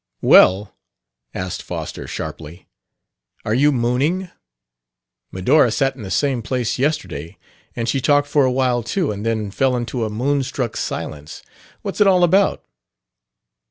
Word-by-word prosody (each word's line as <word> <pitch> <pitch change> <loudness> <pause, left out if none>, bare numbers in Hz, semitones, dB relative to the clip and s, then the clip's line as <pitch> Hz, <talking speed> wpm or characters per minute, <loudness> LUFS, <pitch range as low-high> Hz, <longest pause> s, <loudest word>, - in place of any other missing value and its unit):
"Well," 95 +3 +5 0.6
asked 90 -1 -4
Foster - - -6
sharply, 80 +3 -7 0.8
"are 105 - 0
you 145 +5 +4
mooning? 140 +9 0 1.0
Medora 125 +8 +3
sat 135 +2 0
in 130 - -11
the 100 - -7
same 130 +5 0
place 125 +1 -2
yesterday, 130 - -2 0.4
and 115 -1 -3
she 135 +2 0
talked 145 +2 +3
for 145 0 +2
awhile 130 -1 +1
too 155 - -1
and 105 0 -6
then 110 -3 -2
fell 130 +4 +1
into 120 0 -3
a 110 - -2
moonstruck 125 0 -2
silence. 75 0 -5 0.4
What's - - -4
it 205 - +6
all 185 -2 +4
about?" 190 +3 +2
125 Hz, 135 wpm, -20 LUFS, 110-145 Hz, 1.0 s, it